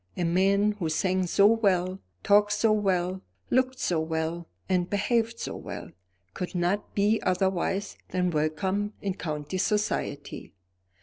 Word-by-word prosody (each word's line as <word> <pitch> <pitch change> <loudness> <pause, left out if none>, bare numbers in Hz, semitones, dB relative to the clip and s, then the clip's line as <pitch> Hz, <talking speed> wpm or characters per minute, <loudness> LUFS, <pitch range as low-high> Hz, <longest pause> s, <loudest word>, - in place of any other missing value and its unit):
A 180 - 0
man 195 +4 +3
who 165 -4 -1
sang 185 +3 +1
so 200 +3 +4
well, 190 -4 +2 0.2
talked 205 +1 +4
so 215 +1 +3
well, 190 -3 +1 0.3
looked 255 +1 +2
so 175 -9 0
well, 160 +1 -2 0.2
and 180 -2 +1
behaved 230 +3 0
so - - -4
well, - - -7 0.4
could 180 0 -5
not 180 +4 -1
be 210 +2 +2
otherwise 190 +2 0
than 180 -1 0
welcome 185 +7 -1
in 195 -2 -1
county 155 +1 -4
society. 180 - -2
190 Hz, 135 wpm, -27 LUFS, 175-205 Hz, 0.4 s, so